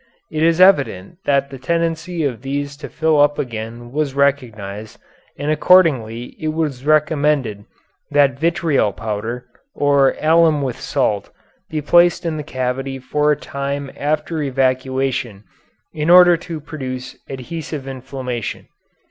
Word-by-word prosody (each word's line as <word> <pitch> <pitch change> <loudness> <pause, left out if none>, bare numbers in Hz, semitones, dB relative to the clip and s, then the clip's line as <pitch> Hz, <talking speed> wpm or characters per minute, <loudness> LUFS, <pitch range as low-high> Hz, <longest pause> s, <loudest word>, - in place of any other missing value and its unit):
It 155 -1 -2
is 165 +1 +3
evident 145 - +3
that 140 0 +1
the 135 - -8
tendency 165 +3 -1
of 130 -5 -2
these 140 +1 -3
to 150 - -8
fill 160 -2 +2
up 145 0 +3
again 115 0 -5
was 145 -1 -2
recognized, 110 -7 -1 0.4
and 145 +2 -1
accordingly 140 -9 +3
it 155 - -3
was 145 -6 -2
recommended 150 -8 +1 0.4
that 140 -3 +3
vitriol 160 - +1
powder, 110 +3 -4 0.3
or 140 -2 +3
alum 160 -2 +4
with 130 -3 -3
salt, 105 -8 -1 0.4
be 155 -1 -3
placed 175 +3 +4
in 160 -2 -1
the - - -3
cavity 135 -1 -3
for 150 +3 0
a - - +3
time 140 0 -4
after 155 +2 -2
evacuation 130 -5 -1 0.5
in 155 +1 -2
order 175 0 +8
to 165 -1 -6
produce 130 -4 -6
adhesive 140 +1 -6
inflammation. 130 -3 -5
140 Hz, 130 wpm, -19 LUFS, 130-155 Hz, 0.5 s, order